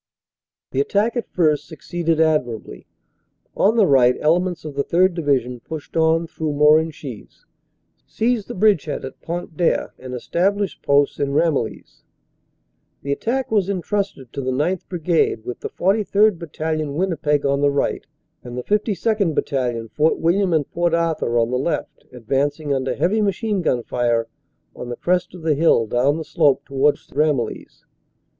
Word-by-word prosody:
The 135 Hz, -, +1 dB
attack 205 Hz, -, 0 dB
at 240 Hz, -, -3 dB
first 150 Hz, -4 st, +1 dB
succeeded 165 Hz, 0 st, -2 dB
admirably. 125 Hz, -, -1 dB, 0.7 s
On 215 Hz, +3 st, +3 dB
the 215 Hz, -, +6 dB
right 125 Hz, -5 st, +5 dB
ele 160 Hz, +3 st, +3 dB
ments 180 Hz, -3 st, -4 dB
of 150 Hz, -, -6 dB
the 140 Hz, 0 st, -1 dB
3rd. 180 Hz, +4 st, +3 dB
Division 135 Hz, -7 st, 0 dB
pushed 155 Hz, +4 st, -9 dB
on 165 Hz, +1 st, +3 dB
through 160 Hz, -2 st, -4 dB
Morenchies, 150 Hz, -4 st, +1 dB, 0.6 s
seized 230 Hz, -2 st, -1 dB
the -, -, -6 dB
bridgehead 190 Hz, -9 st, +1 dB
at 130 Hz, -, -10 dB
Pont 170 Hz, -1 st, -5 dB
d 175 Hz, -, 0 dB
Aire -, -, 0 dB
and 130 Hz, 0 st, -7 dB
established 195 Hz, -, -1 dB
posts 140 Hz, 0 st, +2 dB
in 140 Hz, -1 st, -1 dB
Ramillies. 145 Hz, -7 st, -1 dB, 1.0 s
The 140 Hz, -, -3 dB
attack 240 Hz, -, -1 dB
was 200 Hz, -3 st, +2 dB
entrusted 195 Hz, -, -3 dB
to 140 Hz, -, -3 dB
the 130 Hz, -, -2 dB
9th. 155 Hz, +8 st, -1 dB
Brigade, 165 Hz, -10 st, 0 dB
with 125 Hz, -, -5 dB
the -, -, -5 dB
43rd. 205 Hz, 0 st, +2 dB
Battalion, 155 Hz, -2 st, -3 dB
Winnipeg, 150 Hz, -5 st, 0 dB
on 140 Hz, 0 st, +1 dB
the 145 Hz, -, +4 dB
right, 140 Hz, 0 st, -1 dB, 0.4 s
and 120 Hz, 0 st, -8 dB
the 125 Hz, -, -3 dB
S2nd. 210 Hz, -, 0 dB
Battalion, 120 Hz, -5 st, -1 dB
Fort 155 Hz, +6 st, +1 dB
William 180 Hz, +3 st, +1 dB
and 155 Hz, -4 st, +1 dB
Port 175 Hz, -1 st, +1 dB
Arthur, 165 Hz, -8 st, 0 dB
on 115 Hz, +1 st, +1 dB
the 125 Hz, -, 0 dB
left, 155 Hz, +6 st, -3 dB
advancing 140 Hz, +5 st, -1 dB
under 130 Hz, -1 st, -1 dB
heavy 215 Hz, +5 st, +1 dB
machine 205 Hz, 0 st, 0 dB
gun 125 Hz, -7 st, 0 dB
fire 120 Hz, -2 st, 0 dB, 0.5 s
on 125 Hz, -, -7 dB
the 120 Hz, -, -4 dB
crest 180 Hz, +3 st, -1 dB
of 175 Hz, -, -11 dB
the 160 Hz, -1 st, +2 dB
hill 145 Hz, -6 st, +3 dB
down 125 Hz, +7 st, +1 dB
the 160 Hz, -, -5 dB
slope 145 Hz, -5 st, +2 dB
towards 140 Hz, +2 st, +1 dB
Ramillies. 145 Hz, -5 st, -1 dB
155 Hz, 160 wpm, -21 LUFS, 135-180 Hz, 1.0 s, the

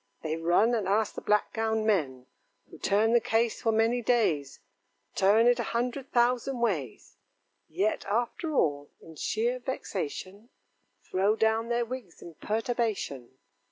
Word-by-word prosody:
They 160 Hz, 0 st, -2 dB
run 175 Hz, +8 st, +2 dB
and 215 Hz, -5 st, 0 dB
ask 210 Hz, +2 st, +1 dB
the -, -, -7 dB
black 210 Hz, 0 st, +1 dB
gowned 220 Hz, -1 st, 0 dB
men, 140 Hz, -, 0 dB, 0.5 s
Who -, -, -12 dB
turn 215 Hz, +3 st, +2 dB
the 240 Hz, -, +6 dB
case 225 Hz, +1 st, 0 dB
for 225 Hz, -, +2 dB
many 225 Hz, +2 st, +2 dB
days 190 Hz, -, +1 dB, 0.5 s
Turn 210 Hz, +4 st, +4 dB
it 245 Hz, 0 st, +4 dB
a 235 Hz, -, -3 dB
hundred 250 Hz, +3 st, -3 dB
thousand 245 Hz, +1 st, +1 dB
ways; 165 Hz, -, -3 dB, 0.5 s
Yet 195 Hz, +7 st, 0 dB
after 245 Hz, -, -2 dB
all, 145 Hz, -, +1 dB
in 160 Hz, -, -13 dB
sheer 235 Hz, -, -1 dB
vexation, 205 Hz, -, -5 dB, 0.5 s
Throw 195 Hz, +3 st, +1 dB
down 225 Hz, +1 st, +1 dB
their 240 Hz, 0 st, +1 dB
wigs 235 Hz, -7 st, -8 dB
in 170 Hz, -, -11 dB
perturbation. 210 Hz, -, -3 dB
220 Hz, 145 wpm, -28 LUFS, 185-235 Hz, 0.5 s, the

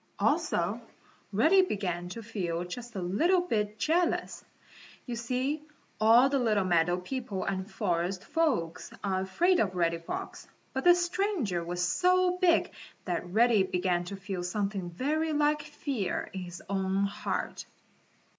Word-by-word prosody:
Also, -, -, +1 dB, 0.5 s
Reddy 315 Hz, -, +5 dB
began 180 Hz, -, -2 dB
to 230 Hz, +5 st, -7 dB
feel 180 Hz, -6 st, -3 dB
just 230 Hz, +6 st, -8 dB
a 190 Hz, -, -2 dB
little 335 Hz, -, +3 dB
bit 210 Hz, -11 st, -1 dB
jealous. 335 Hz, +7 st, 0 dB, 0.6 s
You 245 Hz, -, -4 dB
see 255 Hz, +6 st, -1 dB, 0.4 s
all 230 Hz, +4 st, +6 dB
the 275 Hz, 0 st, +1 dB
little 215 Hz, -5 st, +2 dB
meadow 175 Hz, 0 st, +2 dB
people 205 Hz, 0 st, -4 dB
and 190 Hz, +1 st, -3 dB
forest 185 Hz, -2 st, -1 dB
folks 220 Hz, -, -1 dB
are 190 Hz, -2 st, 0 dB
afraid 345 Hz, -, +2 dB
of 190 Hz, -4 st, 0 dB
Reddy 170 Hz, -1 st, +1 dB
Fox, 165 Hz, -, -6 dB, 0.3 s
but 265 Hz, -, -3 dB
this 350 Hz, 0 st, +6 dB
stranger 345 Hz, -, -1 dB
was 175 Hz, +1 st, -1 dB
so 365 Hz, -, +2 dB
big 345 Hz, -2 st, +3 dB, 0.3 s
that 175 Hz, -1 st, -2 dB
Reddy 225 Hz, +2 st, +4 dB
began 180 Hz, -1 st, 0 dB
to 200 Hz, -, -6 dB
feel 195 Hz, -2 st, -5 dB
something 195 Hz, 0 st, -2 dB
very 305 Hz, -, -1 dB
like 300 Hz, 0 st, +2 dB
fear 285 Hz, -, -3 dB
in 190 Hz, -, -4 dB
his 175 Hz, -1 st, -8 dB
own 195 Hz, 0 st, 0 dB
heart. 200 Hz, 0 st, -3 dB
210 Hz, 145 wpm, -29 LUFS, 180-295 Hz, 0.6 s, all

